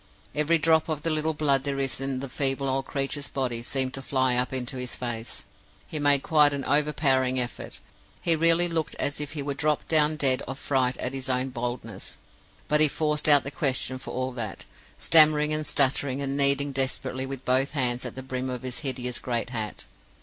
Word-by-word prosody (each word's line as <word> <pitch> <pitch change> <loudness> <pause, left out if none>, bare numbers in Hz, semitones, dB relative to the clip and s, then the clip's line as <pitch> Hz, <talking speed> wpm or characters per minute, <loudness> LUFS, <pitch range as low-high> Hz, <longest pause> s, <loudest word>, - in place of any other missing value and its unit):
Every 150 +3 +2
drop 160 0 +2
of 155 -1 -3
the 165 - 0
little 155 0 0
blood 140 -3 +1
there 140 -1 -2
is 135 -1 -1
in 135 -1 -3
the 140 - -5
feeble 135 +1 -2
old 135 0 -1
creature's 140 +1 -2
body 125 -4 -2
seemed 130 +1 -1
to 135 - -4
fly 130 -2 +1
up 125 +1 0
into 130 0 -3
his 125 -1 -4
face. 120 -2 -5 0.4
He 155 - -5
made 145 -1 +3
quite 150 -2 +4
an 140 -1 -4
overpowering 135 -3 +2
effort; 125 -1 -5 0.4
he 170 - +1
really 165 +2 +4
looked 165 -3 -3
as 145 +1 -2
if 145 0 -5
he 145 -3 -3
would 140 -1 -4
drop 150 0 -1
down 155 -1 +4
dead 135 -3 +4
of 135 +1 -5
fright 130 -3 0
at 130 - -3
his 135 0 -5
own 130 +1 +1
boldness; 120 -4 -6 0.5
but 150 0 +2
he 155 - +7
forced 150 0 0
out 145 -2 +7
the 140 - -5
question 130 -2 -1
for - - -9
all 130 +1 -3
that, 120 -3 -6 0.3
stammering, 155 -1 +5
and 155 0 -2
stuttering, 135 -1 +1
and 140 -1 -3
kneading 140 0 +3
desperately 135 0 -2
with 135 -1 -7
both 130 +3 +1
hands 125 -4 0
at - - -6
the 130 - -7
brim 130 0 -4
of 125 0 -5
his 130 +3 -5
hideous 125 -4 -3
great 120 0 -3
hat. 110 -4 -5
135 Hz, 205 wpm, -26 LUFS, 130-150 Hz, 0.5 s, he